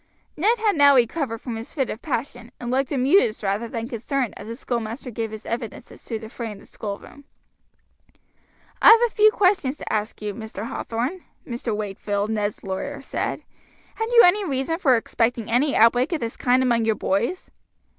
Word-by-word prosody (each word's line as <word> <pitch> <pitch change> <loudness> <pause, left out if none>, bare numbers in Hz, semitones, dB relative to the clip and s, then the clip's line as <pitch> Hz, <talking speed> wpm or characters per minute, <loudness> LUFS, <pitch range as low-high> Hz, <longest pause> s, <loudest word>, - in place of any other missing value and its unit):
Ned 430 +9 +2
had 435 -2 +1 0.2
recovered 250 +1 +1
now - - -33
from 240 -3 -4
his 225 - -9
fit 270 -5 0
of 220 - -7
passion, 245 -4 -4
and 240 0 -4
looked 265 +1 0
amused 270 - +3
rather 200 +4 -1
than 230 0 -4
concerned 245 +1 -2
as - - -9
the 230 - -5
schoolmaster 235 0 -4
gave 225 0 -3
his 220 0 -9
evidence 230 0 -5
as - - -15
to 225 - -3
the 220 0 -9
fray 230 0 -6
in 205 - -9
the - - -16
schoolroom. 210 +7 -8 1.6
"I - - +9
have 455 +1 +8
a 470 - -4
few 430 0 +6
questions 365 -10 +2
to - - -5
ask 215 0 -2
you, 210 -1 -4
Mr. 220 0 -7
Hathorn," 250 +11 -3 0.2
Mr. 235 -3 -3
Wakefield, 205 0 -2
Ned's 210 -1 -2
lawyer, 280 +10 -4
said. - - -3 0.5
"Had 445 - -2
you 475 -1 +7
any 400 +4 +4
reason 295 0 -1
for 260 -9 +4
expecting 230 0 -1
any 275 +5 +2
outbreak 245 +5 +4
of 325 - 0
this 230 -2 -4
kind 255 +1 +2
among 235 -2 +2
your 220 -1 +2
boys?" 225 - -1
240 Hz, 190 wpm, -23 LUFS, 220-280 Hz, 1.6 s, I